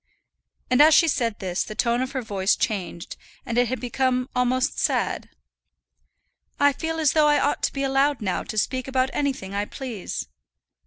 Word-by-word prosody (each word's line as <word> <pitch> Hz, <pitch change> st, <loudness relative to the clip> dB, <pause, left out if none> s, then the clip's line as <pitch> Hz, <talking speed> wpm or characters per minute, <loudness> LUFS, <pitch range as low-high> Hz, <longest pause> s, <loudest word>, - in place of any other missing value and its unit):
And 255 Hz, -, +5 dB
as 310 Hz, +1 st, +7 dB
she 335 Hz, -, +5 dB
said 235 Hz, -8 st, 0 dB
this 185 Hz, -2 st, -2 dB
the 215 Hz, -, -8 dB
tone 235 Hz, +2 st, +1 dB
of 260 Hz, +1 st, -3 dB
her 260 Hz, -2 st, -2 dB
voice 200 Hz, -2 st, 0 dB
was -, -, +3 dB
changed, 185 Hz, -6 st, -6 dB, 0.3 s
and 235 Hz, -3 st, -3 dB
it 245 Hz, 0 st, +3 dB
had 255 Hz, +2 st, -3 dB
become 255 Hz, +1 st, -1 dB
almost 250 Hz, +1 st, +1 dB
sad. -, -, -1 dB, 1.3 s
"I 285 Hz, 0 st, +4 dB
feel 325 Hz, +3 st, -3 dB
as 310 Hz, -3 st, +3 dB
though 305 Hz, -1 st, +4 dB
I 295 Hz, 0 st, +4 dB
ought 290 Hz, -, 0 dB
to -, -, +1 dB
be 275 Hz, -, -3 dB
allowed 275 Hz, 0 st, +2 dB
now 190 Hz, -4 st, -1 dB
to 215 Hz, -, -7 dB
speak 255 Hz, +4 st, -1 dB
about 260 Hz, 0 st, 0 dB
anything 265 Hz, -9 st, -2 dB
I 205 Hz, +1 st, -1 dB
please." 230 Hz, -, -6 dB
255 Hz, 190 wpm, -24 LUFS, 220-275 Hz, 1.3 s, as